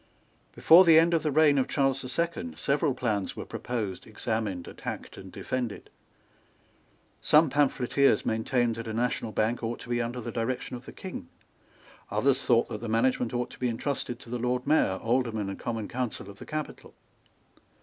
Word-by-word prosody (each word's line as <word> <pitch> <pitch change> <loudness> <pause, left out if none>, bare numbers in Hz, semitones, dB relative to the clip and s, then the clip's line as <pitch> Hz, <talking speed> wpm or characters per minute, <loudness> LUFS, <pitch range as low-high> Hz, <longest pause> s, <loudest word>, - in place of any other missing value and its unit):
Before 170 +3 +7
the 165 -3 +7
end 165 +1 +5
of 165 - +3
the 155 - 0
reign 145 -1 +5
of 130 - +1
Charles 135 -1 +1
the 130 - -6
Second 125 - -2
several 140 - +1
plans 110 -6 -1
were - - -6
proposed, 110 -7 -4
examined, 110 -5 -3
attacked - - -7
and - - -11
defended. 125 -5 -4 1.3
Some 150 -1 +5
pamphleteers 140 -1 +2
maintained 115 +1 0
that 115 0 -6
a 110 - -4
national 120 -1 -1
bank 110 +3 0
ought 115 0 -3
to - - -10
be 120 0 +1
under 120 +2 -3
the 120 0 -5
direction 125 +2 -3
of 120 - -10
the - - -7
King. - - -8 0.8
Others 135 0 +1
thought 120 -1 +3
that 105 - -5
the 115 - -4
management 120 +1 +1
ought 120 0 -2
to - - -13
be 125 - 0
entrusted 120 +1 -3
to 115 - -11
the 125 - -2
Lord 125 +1 -1
Mayor, 140 -10 +3
Aldermen 115 -4 0
and 95 - -8
Common 115 -3 -3
Council 120 -5 -4
of 100 - -17
the - - -10
capital. 155 -1 -6
125 Hz, 180 wpm, -28 LUFS, 115-135 Hz, 1.3 s, Before